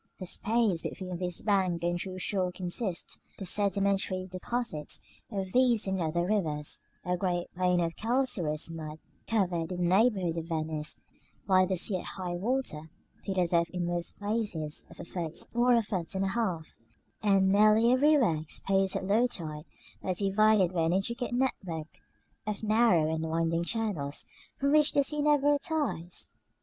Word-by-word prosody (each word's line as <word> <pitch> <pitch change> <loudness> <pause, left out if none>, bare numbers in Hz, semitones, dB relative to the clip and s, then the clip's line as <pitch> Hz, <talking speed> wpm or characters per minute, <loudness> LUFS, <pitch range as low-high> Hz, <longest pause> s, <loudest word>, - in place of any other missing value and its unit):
The 185 - -6
space 210 -2 +1
between 185 -1 -5
this 180 -1 -3
bank 185 -5 +1
and 175 0 +1
the 175 - -2
true 185 0 -5
shore 185 -1 -1
consists 180 +1 -3
of - - -36 0.2
the 195 - -6
sedimentary 195 -1 +1
deposits 185 -2 -3 0.3
from 195 -3 -3
these 245 0 +3
and 190 -1 -1
other 170 +2 0
rivers, 160 -7 -1 0.3
a 180 0 +1
great 175 -1 -2
plain 180 0 +2
of 165 -1 -1
calcareous 215 - 0
mud, 155 -2 -6 0.3
covered, 180 -7 0
in 180 - -3
the 175 -1 +1
neighborhood 195 -7 +2
of 165 - -3
Venice, 155 -2 -2 0.5
by 185 -1 +5
the 190 - 0
sea 185 +2 +1
at - - -7
high 180 -2 -3
water, 180 -6 -2 0.4
to 195 - -1
the 180 -1 +3
depth 170 0 +2
in 180 0 -2
most 175 0 -3
places 205 -8 -3
of - - -14
a - - -6
foot 170 -3 -4
or 240 +1 +4
a 230 - +3
foot 190 -5 -3
and 190 +1 +1
a - - 0
half, 190 -8 -1 0.5
and 195 -3 +4
nearly 215 +3 +5
everywhere 260 - +4
exposed 195 +5 0
at - - -2
low 220 +6 +3
tide, 155 -8 -6 0.4
but 185 -2 -2
divided 200 -1 +3
by 170 - +1
an 165 +1 +2
intricate 235 +7 -1
network 190 -11 -2 0.5
of 210 0 -3
narrow 215 -8 +3
and 160 0 -2
winding 165 +1 0
channels, 175 -9 -2 0.3
from 280 +1 +2
which 300 0 +4
the 280 - +4
sea 300 +2 -1
never 290 -1 +4
retires. 285 - -2
185 Hz, 170 wpm, -30 LUFS, 170-220 Hz, 0.5 s, by